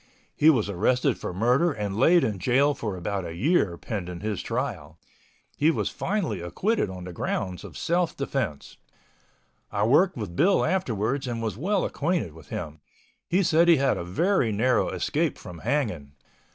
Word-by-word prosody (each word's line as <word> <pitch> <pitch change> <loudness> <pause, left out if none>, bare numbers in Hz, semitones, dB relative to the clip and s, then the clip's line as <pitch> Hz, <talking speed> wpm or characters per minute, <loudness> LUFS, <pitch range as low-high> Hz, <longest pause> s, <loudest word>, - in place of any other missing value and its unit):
He 155 - +5
was 120 -10 +3
arrested 125 +7 +1
for - - -4
murder 125 - +2
and 105 -6 -4
laid 165 +9 +5
in 105 -4 -1
jail 135 +9 +3
for 105 -8 -4
about 95 +2 -3
a 85 -1 -6
year 105 - +1
pending 90 -5 -5
his 105 -2 -2
trial. - - -4 0.6
He 150 - +4
was 165 - 0
finally 180 - -2
acquitted 180 - -1
on 90 -1 -7
the 90 0 -7
grounds 90 +1 -3
of - - -10
self 170 0 0
defense. 130 - -3 0.9
I 100 0 0
worked 150 - +4
with 100 -7 -5
Bill 190 - +3
afterwards 130 - -1
and 120 -2 -3
was 110 -4 -3
well 190 - 0
acquainted 165 - -1
with 80 -2 -15
him. 80 -2 -6 0.5
He 185 +3 +3
said 165 0 +4
he 170 - +7
had 135 0 +2
a - - -4
very 125 - +1
narrow 120 +5 +2
escape - - -1
from 85 -2 -10
hanging. 90 - -2
115 Hz, 170 wpm, -26 LUFS, -, 0.9 s, he